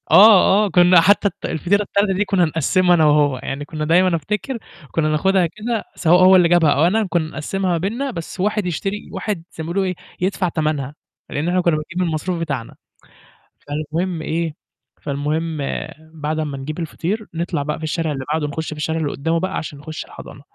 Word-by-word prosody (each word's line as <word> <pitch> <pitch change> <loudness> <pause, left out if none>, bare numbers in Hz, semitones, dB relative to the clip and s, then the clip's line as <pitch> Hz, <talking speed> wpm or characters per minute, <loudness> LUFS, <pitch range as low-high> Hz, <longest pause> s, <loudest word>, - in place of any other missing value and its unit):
آه، 210 0 +7
آه. - - -2
كنا 180 -1 +6
حتى 200 +4 +4
ال - - -5
الفطيرة 175 +6 +1
التالتة 200 0 +1
دي 200 +2 0
كنا 190 -3 +2
نقسّمها 175 +3 +2
أنا 160 -2 +4
وهو، 145 -3 +3
يعني 140 +2 -4
كنا 155 0 -4
دايمًا 175 +2 +4
أفتكر 210 - -3 0.3
كنا 155 -2 +1
ناخدها 185 +4 +2
كده 215 +6 -3
سواء 175 +2 +4
هو 190 +1 +8
اللي 180 -2 +5
جابها 170 -3 +4
أو 145 - +3
أنا، 210 +4 +2
كنا 165 -2 0
نقسّمها 185 +5 -2
ما 170 - +1
بيننا 230 +11 -2
بس 170 -2 -7
واحد 210 +1 0
يشتري 195 +4 -3
واحد 200 -6 -3
زي 160 - -7
ما - - -6
بيقولوا 195 +2 +1
إيه 185 -1 -2 0.3
يدفع 185 -1 0
تمنها، 155 -4 -2 0.3
لإن 150 +3 -2
إحنا 180 +1 +2
كنا 170 -3 +2
بنجيب 155 +3 -6
من - - +2
المصروف 165 +2 -2
بتاعنا، 140 -8 -4 0.9
فالمهم 155 +4 -3
إيه؟ 160 -1 -2 0.5
فالمهم 155 +3 -2 0.6
بعد 155 0 -3
أمّا 150 -3 -3
نجيب 150 +5 -6
الفطير 180 +6 -3
نطلع 165 -3 -2
بقى 150 +1 -3
في 160 - -10
الشارع 160 0 -1
اللي 135 -2 -4
بعدُه 155 -1 0
نخش 160 +2 -4
في - - -4
الشارع 160 +2 -2
اللي 150 -3 -1
قُدّامه 165 +4 -1
بقى 185 +2 -2
عشان 145 -2 -6
نخُشّ 155 +2 -7
الحضانة، - - -12
165 Hz, 200 wpm, -20 LUFS, 155-185 Hz, 0.9 s, هو